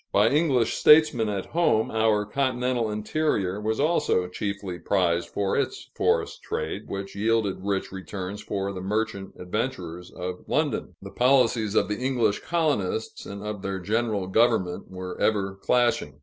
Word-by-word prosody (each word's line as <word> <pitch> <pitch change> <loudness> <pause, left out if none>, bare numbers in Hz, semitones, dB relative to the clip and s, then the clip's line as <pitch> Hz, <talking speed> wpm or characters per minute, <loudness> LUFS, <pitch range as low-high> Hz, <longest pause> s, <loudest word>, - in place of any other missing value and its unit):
By 105 +3 +4
English 140 -6 +2
statesmen 150 -8 +5
at 100 -2 -2
home, 160 -10 +1
our 110 -2 +2
continental 125 -1 0
interior 105 -3 -1
was 110 +1 -1
also 150 - +2
chiefly 100 -1 -4
prized 85 -1 +1
for 100 -1 -1
its - - -2
forest - - 0
trade, - - -4
which 100 0 -5
yielded 105 -1 +1
rich 100 0 -2
returns 95 +1 -6
for 100 -1 -3
the 95 - -6
merchant 105 0 -2
adventurers 90 -3 -4
of 90 0 -5
London. - - -1
The - - -8
policies 120 -4 +3
of - - +3
the 105 +1 -3
English 125 -5 +1
colonists 145 - -1
and 100 +1 -7
of 105 -2 -4
their 95 -1 -3
general 105 0 0
government 95 -3 +1
were 95 -1 -7
ever 100 -3 +1
clashing. 100 - +1
105 Hz, 150 wpm, -26 LUFS, 95-120 Hz, -, statesmen